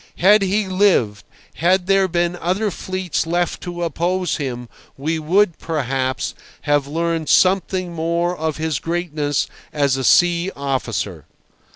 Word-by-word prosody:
Had 205 +3 +5
he 195 +1 +1
lived, 185 - +2 0.3
had 180 +2 +2
there 195 0 +3
been 175 0 0
other 190 +5 -1
fleets 185 -2 -3
left 175 +1 -1
to 175 -1 -5
oppose 175 +3 -1
him, 125 -4 -4 0.3
we 160 +4 -1
would, 175 +3 +2
perhaps, 135 -4 -2 0.3
have 145 -2 +1
learned 165 0 -2
something 185 -1 +2
more 170 +2 -1
of 160 -2 -3
his 160 -3 -1
greatness 155 -4 -1 0.3
as 140 -3 +1
a 135 - -3
sea 175 +6 +4
officer. 115 - -3
170 Hz, 135 wpm, -20 LUFS, 145-185 Hz, 0.3 s, Had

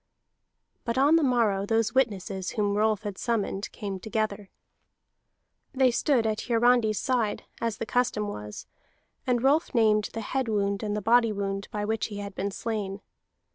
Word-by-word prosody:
But 235 +1 -2
on 285 +4 +5
the 330 - +4
morrow 230 -8 +2
those 225 0 +1
witnesses 200 -6 0
whom 205 -1 +1
Rolf 215 0 +1
had 205 -3 -5
summoned 215 -4 -2
came 195 -2 -5
together. 210 -1 -3 1.3
They 260 -1 +4
stood 245 -1 +2
at 215 0 -2
Hiarandi's 235 -2 +3
side, 240 -4 0 0.2
as 230 -2 -2
the - - -3
custom 245 -3 0
was, 105 - -7 0.6
and 245 -1 +1
Rolf 285 +2 +2
named 215 -2 +3
the 225 - -4
head 260 +4 -2
wound 200 -2 0
and 210 -1 -2
the 210 - -4
body 230 +1 +4
wound 195 -1 -3
by 210 -1 -3
which 220 +1 -1
he 205 - -7
had 200 0 -6
been 195 +2 -2
slain. 200 -2 -4
215 Hz, 165 wpm, -27 LUFS, 200-235 Hz, 1.3 s, on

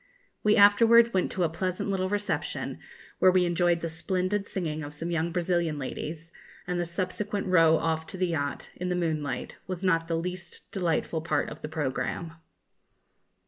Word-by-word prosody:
We 210 0 +4
afterwards 230 +3 +6
went 185 -1 +1
to 185 - 0
a 165 - +2
pleasant 185 +4 -2
little 185 -1 0
reception, 205 0 -2 0.4
where 185 - +7
we 185 -1 +4
enjoyed 175 0 +2
the 170 - -2
splendid 185 +5 -1
singing 155 -5 -3
of 145 +1 -7
some 165 +3 -4
young 170 0 0
Brazilian 170 -2 0
ladies, 155 +4 -6 0.3
and 180 0 -2
the 175 - 0
subsequent 190 +4 -3
row 165 -3 +5
off 160 0 -1
to - - -6
the 185 - +1
yacht, 145 -4 -3
in 180 0 -3
the 180 - 0
moonlight, 155 -5 -2
was 185 0 -5
not 165 -3 +2
the 165 -1 0
least 175 +1 -6
delightful 170 -4 -1
part 155 -2 -1
of 150 - -9
the 150 - -5
programme. 155 +2 -3
175 Hz, 175 wpm, -28 LUFS, 160-185 Hz, 0.4 s, where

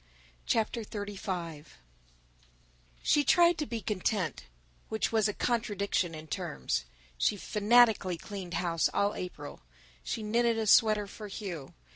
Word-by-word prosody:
CHAPTER 225 +1 +1
XXXV 190 -7 -5 1.4
SHE 295 - +4
tried 345 +2 +5
to 300 - -2
be 230 -2 -4
content, 190 - -1 0.4
which 220 - -1
was 220 -2 +3
a - - 0
contradiction 200 -8 -1
in 155 0 -8
terms. 110 - -3 0.3
She 205 - +2
fanatically 210 -3 +3
cleaned 185 -1 -7
house 170 -2 +1
all 200 +1 +2
April. 150 -5 -7 0.4
She 225 - -3
knitted 230 +2 +2
a 220 - 0
sweater 215 -1 +5
for 210 +1 -9
Hugh. 185 -8 -7
205 Hz, 125 wpm, -30 LUFS, 175-225 Hz, 1.4 s, tried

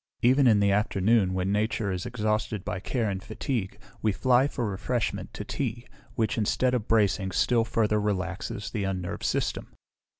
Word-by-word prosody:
Even 130 +2 +5
in 110 -3 +5
the 100 0 +3
afternoon, 105 -1 +2
when 95 +1 0
nature 105 0 0
is 90 +2 -3
exhausted 110 -3 -1
by 90 - -3
care 115 +3 -1
and 95 -2 -3
fatigue, 110 -1 -3 0.2
we 110 - +2
fly 130 +5 +3
for 125 -4 -3
refreshment 110 +4 -2
to - - -5
tea, 120 -3 -3 0.3
which, 110 0 0
instead 125 +4 +1
of 120 -4 -1
bracing, 100 -3 +2
still 115 +5 +2
further 110 -2 +1
relaxes 100 +1 -3
the 105 -4 -2
unnerved 95 -2 -3
system. - - -2
105 Hz, 165 wpm, -27 LUFS, 100-120 Hz, 0.3 s, Even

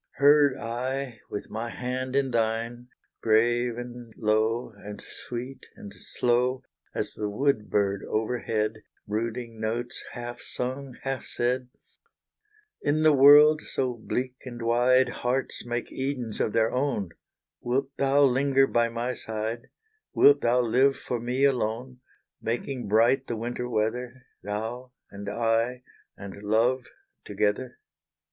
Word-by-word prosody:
Heard 145 -1 +5
I, 125 +1 -3
with 105 - -6
my 115 +2 -3
hand 130 +2 -3
in 135 -2 +2
thine, 115 +1 -1 0.3
Grave 120 +2 +2
and 120 -1 -8
low, 110 +2 +1
and 105 0 -9
sweet 125 +2 -8
and 100 -1 -10
slow, 125 +2 0 0.3
As - - 0
the 105 -1 -3
wood 110 0 0
bird 100 -1 +1
over 110 +3 0
head, 110 -1 -1 0.3
Brooding 115 +2 -3
notes, 120 +3 -2
half 120 0 -6
sung 130 +1 -4
half 135 -1 -3
said, 125 +1 -1 1.1
"In 155 +2 +1
the 155 -1 +6
world 145 +3 +8
so 130 -2 -2
bleak 125 +2 -3
and 120 -2 -7
wide, 125 +2 +4
Hearts 125 +2 -2
make 120 0 -3
Edens 130 -5 -2
of - - +1
their 115 -1 +2
own; 125 -8 -1 0.5
Wilt 135 +3 -1
thou 140 +1 +4
linger 135 +1 +4
by 120 -3 +1
my 120 +2 -2
side, 110 +2 -4 0.5
Wilt 145 0 +6
thou 120 +1 +3
live 130 +4 +3
for 120 - -3
me 125 +3 -1
alone, 125 -1 0 0.4
Making 120 +1 -3
bright 120 +6 +3
the 115 - -3
winter 120 +2 -4
weather, 120 +3 -2 0.2
Thou 115 +5 -5 0.2
and 100 0 -6
I 115 +3 0 0.3
and 100 0 -9
love 120 +4 +1 0.4
together?" 115 +4 -1
120 Hz, 130 wpm, -27 LUFS, 115-130 Hz, 1.1 s, world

